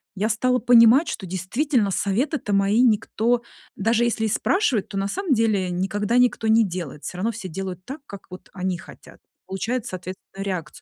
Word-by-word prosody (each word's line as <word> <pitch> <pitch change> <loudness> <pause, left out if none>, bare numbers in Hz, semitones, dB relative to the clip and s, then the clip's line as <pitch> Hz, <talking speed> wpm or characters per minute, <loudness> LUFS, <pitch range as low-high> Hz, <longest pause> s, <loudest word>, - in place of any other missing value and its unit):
я 205 +3 0
стала 250 +3 +1
понимать, 245 +6 +6
что 195 - -4
действительно 205 - 0
советы-то 210 - -1
мои 200 +3 +3
никто, 235 0 +2 0.3
даже 225 +3 +2
если 235 -2 0
и - - +1
спрашивают, 240 - +1
то 200 - -5
на 195 0 0
самом 370 - -1
деле 215 -6 +1
никогда 200 +5 -1
никто 250 -2 +2
не 220 +1 +5
делает. 170 -5 -6
Всё 180 - -5
равно 220 +5 0
все 215 -3 -7
делают 185 +1 -6
так, 275 +3 -8
как 200 -7 -10
вот 185 0 -11
они 185 -1 -2
хотят. 170 - -15 0.3
Получается, 225 +5 -3
соответственно, 185 +1 -8
реакц 180 -7 -5
210 Hz, 180 wpm, -23 LUFS, 190-240 Hz, 0.3 s, понимать